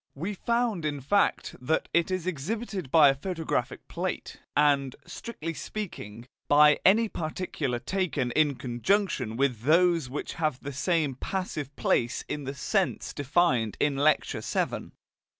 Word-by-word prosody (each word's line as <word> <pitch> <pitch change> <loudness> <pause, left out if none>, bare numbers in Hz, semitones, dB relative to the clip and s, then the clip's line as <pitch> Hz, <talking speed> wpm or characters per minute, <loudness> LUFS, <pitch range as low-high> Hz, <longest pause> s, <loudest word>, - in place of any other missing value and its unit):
We 175 +9 -3
found 235 -3 0
in 145 -2 -2
fact 175 +10 +1
that 155 +6 0
it 170 +1 +2
is 185 -2 -2
exhibited 185 - -3
by 150 0 +7
a - - +3
photographic 165 +3 -3
plate, - - -4 0.2
and, 140 -3 +3
strictly 165 -9 -6
speaking, 120 - -7 0.2
by 150 +1 +6
any 225 +4 +5
particular 155 - -3
taken 150 -2 -1
in 145 0 +2
conjunction 125 - 0
with 130 -4 +1
those 165 +1 +3
which 140 - -5
have 155 -5 0
the 140 - -5
same 155 0 +1
"passive" 150 -2 -4
place 120 +2 0
in 145 -2 -4
the 135 +1 -4
sense 195 +7 -1
defined 140 -6 +1
in 145 -2 +2
Lecture 150 +3 +2
VII. - - -2
150 Hz, 140 wpm, -28 LUFS, 135-185 Hz, 0.2 s, by